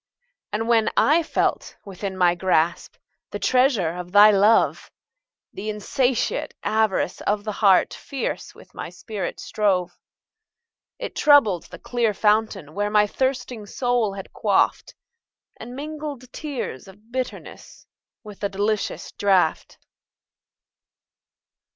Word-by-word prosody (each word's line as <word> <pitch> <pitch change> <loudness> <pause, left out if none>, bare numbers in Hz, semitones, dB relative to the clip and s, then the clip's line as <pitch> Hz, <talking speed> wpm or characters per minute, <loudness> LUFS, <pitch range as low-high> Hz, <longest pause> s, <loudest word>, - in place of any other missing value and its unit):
And 225 +2 -2
when 230 -2 +3
I 310 +4 +4
felt 325 - -1
within 195 -1 -6
my 175 -2 +4
grasp, 175 -2 0 0.3
The - - -5
treasure 250 - +2
of 180 +1 -7
thy 205 +2 +8
love; 205 +3 +3 0.6
The 215 - -5
insatiate 245 +4 -1
avarice 215 -4 0
of 205 0 -1
the 215 - -3
heart 195 -3 +4
Fierce 275 -3 -5
with - - -17
my - - -6
spirit 215 -4 -6
strove.It 215 - -5
troubled 230 - +4
the - - -11
clear 235 -4 -1
fountain 210 -7 +1
where 205 +2 -1
My 210 0 +4
thirsting 250 -2 -2
soul 245 -3 0
had 195 -1 -9
quaffed, - - +1 0.6
And 245 +2 -9
mingled 290 -3 -7
tears 275 - -5
of 210 +4 -17
bitterness 255 0 -6 0.4
With 210 -3 -11
the 200 - -1
delicious 205 +2 -2
draught. 190 -5 +1
215 Hz, 115 wpm, -23 LUFS, 195-250 Hz, 0.6 s, thy